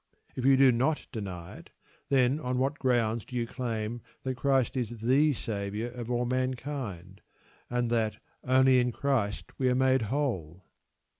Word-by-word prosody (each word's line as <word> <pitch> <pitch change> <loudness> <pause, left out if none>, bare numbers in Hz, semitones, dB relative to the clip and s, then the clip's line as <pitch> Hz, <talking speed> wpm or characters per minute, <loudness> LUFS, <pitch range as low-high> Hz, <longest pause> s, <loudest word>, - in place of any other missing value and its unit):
If 130 - -3
you 135 0 +6
do 135 -1 +7
not 130 +6 0
deny 95 -7 -6
it, - - -14 0.4
then 135 +1 +3
on 125 -4 -2
what 135 +3 0
grounds 115 -4 +1
do 125 - -10
you 120 -1 0
claim 115 -2 -4 0.2
that 130 - -1
Christ 135 -1 +1
is 120 -2 -3
the 135 +7 +4
Saviour 105 0 -4
of 120 -1 -7
all 120 0 0
mankind, 125 - -3 0.5
and 120 -1 0
that 110 -2 +1 0.3
"only 130 0 +5
in 125 0 +1
Christ 120 -6 -1
we 130 -1 +3
are 125 - +2
made 130 0 +3
whole"? 95 - -2
125 Hz, 160 wpm, -29 LUFS, 110-130 Hz, 0.5 s, do